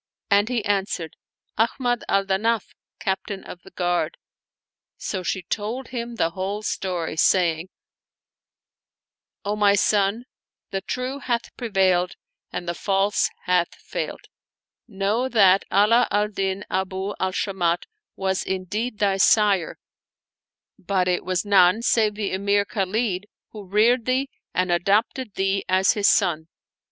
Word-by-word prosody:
and 205 +2 +4
he 240 -4 -1
answered, 195 -5 -1 0.4
"Ahmad 245 +1 +1
al 195 0 +2
Danaf, 210 +3 0 0.3
Captain 190 +1 -3
of 175 - -10
the 190 - -15
Guard." 175 - -1 0.8
So 190 - -3
she 185 +1 -2
told 225 +8 -4
him 235 -1 -5
the 165 -7 +1
whole 195 +4 -4
story, 180 -6 -2
saying, 170 0 +2 0.9
" - - -64
O 205 +1 0
my 205 -1 +4
son, 205 +3 +1 0.5
the 195 - -2
True 255 +5 -4
hath 240 -4 -3
prevailed 190 -6 +1 0.4
and 175 - -5
the 170 - -1
False 195 +3 +1
hath 180 -1 +1
failed: - - -5 0.7
know 215 +4 -1
that 195 -5 +5
Ala 220 +5 +4
al 210 +1 +1
Din 195 -1 -2
Abu 190 +1 -2
al 190 0 0
Shamat 180 -3 0 0.3
was 190 -1 -1
indeed 205 +5 -3
thy 200 -2 +1
sire, 200 -3 +3 1.0
but 185 -1 0
it 180 -1 0
was 185 +1 -1
none 200 +1 +5
save 215 -3 +2
the 210 -2 -2
Emir 200 +1 +1
Khalid 200 0 -1 0.2
who 210 -3 -10
reared 225 +5 +3
thee 265 +2 0 0.2
and 185 -1 0
adopted 205 +6 +1
thee 195 0 0
as 190 +1 +4
his 205 -2 +2
son. 160 -5 +2
195 Hz, 135 wpm, -23 LUFS, 185-215 Hz, 1.0 s, that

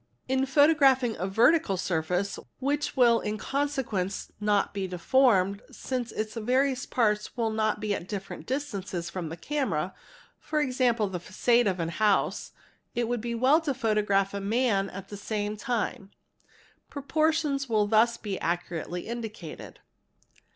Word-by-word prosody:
In 265 +1 +1
photographing 270 -4 +4
a 185 - -1
vertical 230 - +3
surface 180 +2 -1 0.2
which 290 +2 -1
will 235 -2 +5
in 210 +1 -3
consequence 260 -9 -2
not 210 -1 +1
be 195 -1 -2
deformed, 200 0 +2
since 250 -3 -4
its 215 0 -3
various 255 +3 0
parts 210 -1 0
will 225 -2 0
not 215 -1 0
be 210 -1 -1
at 180 - -5
different 195 -1 -6
distances 200 -11 -3
from 175 -4 -4
the 165 - -7
camera, 190 - -2 0.7
e.g., 290 -4 0 0.2
the 210 -6 -1
facade 235 +6 +2
of 185 -2 0
a 165 - -1
house, 210 +2 +1 0.4
it 240 -1 0
would 240 -1 -1
be 235 +1 -3
well 265 +7 +4
to 290 -5 -2
photograph 210 -4 +1
a 200 - -3
man 205 -2 +1
at 195 +1 -9
the 205 - -7
same 210 +1 -3
time; 215 -4 -3 0.8
proportions 295 -1 0
will 215 -2 +3
thus 225 +3 +3
be 200 -3 -4
accurately 175 0 -3
indicated. 220 -8 -7
215 Hz, 145 wpm, -28 LUFS, 195-260 Hz, 0.8 s, will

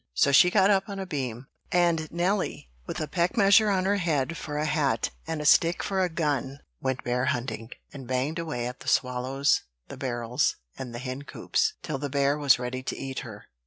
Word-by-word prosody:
So 140 - +4
she 160 +6 +7
got 195 +1 +4
up 195 0 +2
on 200 - -5
a 195 - -4
beam; 130 -7 -4 0.3
and 170 -3 +2
Nelly, 175 - -1 0.2
with - - -4
a 155 - -2
peck 175 +6 0
measure 205 +1 +6
on 190 -2 +1
her 200 +1 +2
head 165 -4 0
for 150 -2 -5
a 150 - 0
hat, 155 -3 0 0.2
and 160 -1 -2
a 150 - -4
stick 165 +3 +4
for 190 -1 0
a 180 - +1
gun, 145 -4 -2 0.2
went 130 -1 -2
bear 125 +1 0
hunting, 120 -5 -2 0.2
and 135 -4 -9
banged 130 +6 -1
away 150 -8 -3
at 125 +1 -6
the - - -12
swallows, 130 +2 +1 0.3
the - - -8
barrels, 120 +1 0 0.2
and 125 -2 -7
the - - -3
hencoops, 130 +2 -2
till 135 - -3
the 145 0 -3
bear 140 +1 +2
was 145 -3 +4
ready 125 +1 -4
to 130 - -4
eat 135 -1 -4
her. 110 -6 -9
145 Hz, 205 wpm, -27 LUFS, 130-170 Hz, 0.3 s, she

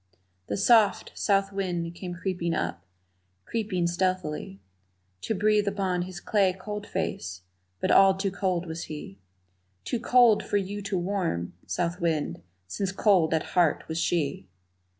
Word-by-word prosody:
The 100 - -2
soft, 220 - +4
south 195 -1 +1
wind 175 -4 -2
came 175 0 -6
creeping 175 -2 -2
up, 85 - -2 0.6
creeping 205 -6 -1
stealthily 175 - -1 0.6
To 220 - -2
breathe 210 +1 +2
upon 190 -3 0
his 180 0 -6
clay 195 -1 +2
cold 210 +1 -6
face 90 - -4 0.4
but - - +1
all 195 0 +7
too 195 0 -1
cold 185 -3 -1
was 165 0 -5
he, 150 -10 -8 0.6
Too 240 - -2
cold 240 -2 +5
for 205 - 0
you 200 +1 -3
to 200 -1 -2
warm, 175 - -2
south 175 +1 -1
wind, 160 -3 -1 0.2
since 190 - -3
cold 190 -4 +3
at 160 -1 +1
heart 175 -5 +2
was 160 +1 -3
she! 165 -5 -1
185 Hz, 145 wpm, -27 LUFS, 170-200 Hz, 0.6 s, all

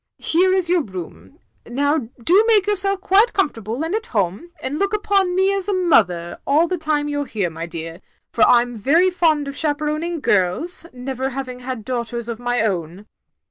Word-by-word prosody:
Here 365 +3 +2
is 375 -2 +1
your 350 0 +2
room. 170 - -9 0.3
Now 280 0 0
do 375 - +5
make 425 -4 +4
yourself 395 -1 +1
quite 400 +5 +3
comfortable 235 - -1
and 330 - -3
at 440 +1 -2
home, 200 - -1
and 290 +2 -4
look 400 +1 0
upon 395 -3 +1
me 380 +1 +3
as 390 -1 -2
a 405 - +1
mother 195 - +2
all 305 +5 +3
the 365 - -1
time 300 -2 0
you 290 0 -2
're - - -3
here, 195 -6 -2
my 165 +1 -6
dear, 165 +1 -7 0.3
for 230 - -3
I 240 -1 +6
'm 245 -1 -8
very 325 - +3
fond 315 -5 +1
of 280 - -6
chaperoning 305 +3 -2
girls, 235 - 0
never 260 +1 -4
having 260 -1 -6
had 250 -3 -6
daughters 235 -2 -4
of 235 -1 -5
my 245 -1 0
own." 185 -1 -3
285 Hz, 190 wpm, -20 LUFS, 225-355 Hz, 0.3 s, I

